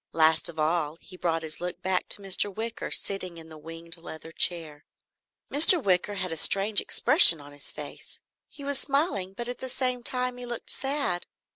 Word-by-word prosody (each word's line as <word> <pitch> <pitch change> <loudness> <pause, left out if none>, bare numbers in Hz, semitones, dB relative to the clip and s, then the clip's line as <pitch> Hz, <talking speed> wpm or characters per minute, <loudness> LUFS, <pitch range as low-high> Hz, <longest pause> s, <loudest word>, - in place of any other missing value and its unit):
Last 160 +1 +2
of 165 - -12
all 155 0 -2
he 185 - -15
brought 165 -2 -3
his 155 +1 -8
look 180 +1 -7
back 185 -1 -2
to 200 - -1
Mr. 195 +1 0
Wicker, 225 +3 -7
sitting 185 -3 -1
in 160 -1 -14
the 155 - -13
winged 165 +2 -11
leather 160 -1 -11
chair. 160 -3 -1 0.7
Mr. 315 +5 +8
Wicker 195 - -1
had 185 -2 -4
a 165 - -5
strange 200 +5 +4
expression 165 - +6
on 145 0 -14
his 145 -1 -10
face. - - -10 0.3
He 290 - -14
was 280 -1 -2
smiling 275 - -1
but 240 +4 -7
at 245 0 -5
the 260 - -4
same 255 -1 -1
time 250 0 -2
he 250 - -9
looked 240 -1 -4
sad. 270 -10 -2
185 Hz, 190 wpm, -25 LUFS, 165-245 Hz, 0.7 s, Mr